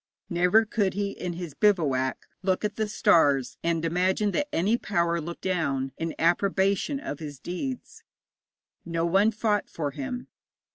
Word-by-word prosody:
Never 180 +6 +4
could 205 -3 0
he 200 0 -1
in 180 -2 -5
his 170 -3 -6
bivouac 145 -11 +1 0.2
look 190 +2 0
at 210 0 -2
the 220 -1 -1
stars, 145 - +3
and 170 -1 0
imagine 185 +5 +1
that 290 +8 0
any 195 +7 +2
power 170 -7 0
looked 170 +2 -7
down 140 -8 0
in 165 0 -4
approbation 195 - +1
of 145 - -6
his 145 -3 -7
deeds. 240 - -5 0.8
No 165 -1 -1
one 195 +5 +4
fought 215 -2 0
for 145 -3 -3
him. 150 - -5
180 Hz, 150 wpm, -27 LUFS, 165-205 Hz, 0.8 s, Never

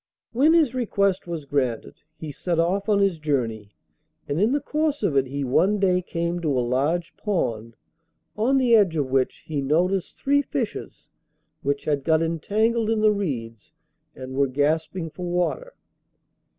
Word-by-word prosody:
When 280 +7 +4
his 305 -7 +3
request 200 -7 0
was 165 -4 -5
granted, 130 -5 -1 0.2
he 155 -1 -6
set 170 +4 -2
off 190 +5 0
on 205 - +4
his 195 -5 +1
journey, 115 -9 -2 0.5
and 145 +5 -1
in 215 +4 +3
the 290 - +2
course 300 -1 -1
of 175 -8 +1
it 135 -1 +2
he 140 +2 -3
one 185 +11 +2
day 185 -2 +2
came 170 0 -3
to 150 -5 0
a - - +2
large 150 +7 -1
pond, 115 - -2 0.6
on 245 +6 +2
the 245 -3 +4
edge 195 -7 +3
of 140 -4 -1
which 130 -1 0
he 150 -3 -2
noticed 175 +6 0
three 285 +1 +2
fishes - - -5 0.5
which 140 0 -2
had 145 -2 0
got 160 +1 +2
entangled 215 +8 0
in 225 -1 +1
the 215 0 +5
reeds 140 - -5 0.4
and 130 0 -8
were 140 +1 +2
gasping 160 +5 -1
for 180 +2 -6
water. 180 - -2
170 Hz, 165 wpm, -24 LUFS, 140-210 Hz, 0.6 s, the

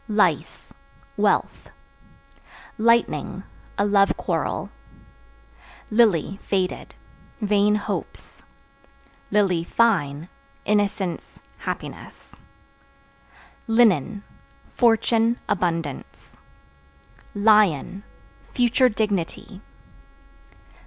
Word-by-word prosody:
Lice 205 - 0 0.4
Wealth. - - 0 1.1
Lightning 230 +1 +1 0.3
A 200 - +2
love 200 -1 +3
quarrel. - - -3 1.2
Lily 205 -4 +2
(Faded) 190 -2 -3 0.4
vain 210 -1 +2
hopes; 210 - -6 1.3
(fine) 165 -10 +1 0.4
innocence, 200 -4 -1 0.2
happiness. - - -7 1.4
Linen 215 - +2 0.5
Fortune, 230 0 +2
abundance. 165 - -3 1.0
Lion 205 -4 +3 0.4
Future 245 +1 +2
dignity. 200 -2 -3
205 Hz, 55 wpm, -23 LUFS, 180-225 Hz, 1.4 s, love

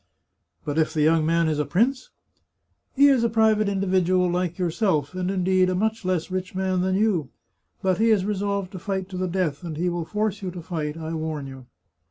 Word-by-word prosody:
" - - -45
But 150 +1 -1
if 160 0 0
the 150 - +2
young 160 0 +3
man 165 0 +2
is 155 -1 0
a - - +2
prince? 235 - 0 0.3
" - - -47
" - - -47
He 280 +1 +6
is 265 -4 +4
a 235 - +2
private 220 -2 +3
individual, 185 -2 +2
like 180 -1 -1
yourself, 175 - 0
and 185 0 -2
indeed 185 -1 +2
a 185 - 0
much 220 +3 -1
less 185 -1 -1
rich 185 0 -4
man 185 -1 0
than 185 +1 +1
you. 190 -9 +1 0.5
But 185 -1 +1
he 225 +1 +3
is 205 -4 +3
resolved 200 -2 -2
to 185 - -7
fight 190 0 -3
to 185 - -6
the 185 0 -1
death, 175 -5 -1
and 160 -3 -5
he 180 +2 0
will 175 -1 -3
force 210 +1 -2
you 190 - -3
to 180 -1 -7
fight, 155 -3 -4
I 160 0 -5
warn 155 -3 -3
you." 130 -2 -10
185 Hz, 230 wpm, -24 LUFS, 165-200 Hz, 0.5 s, He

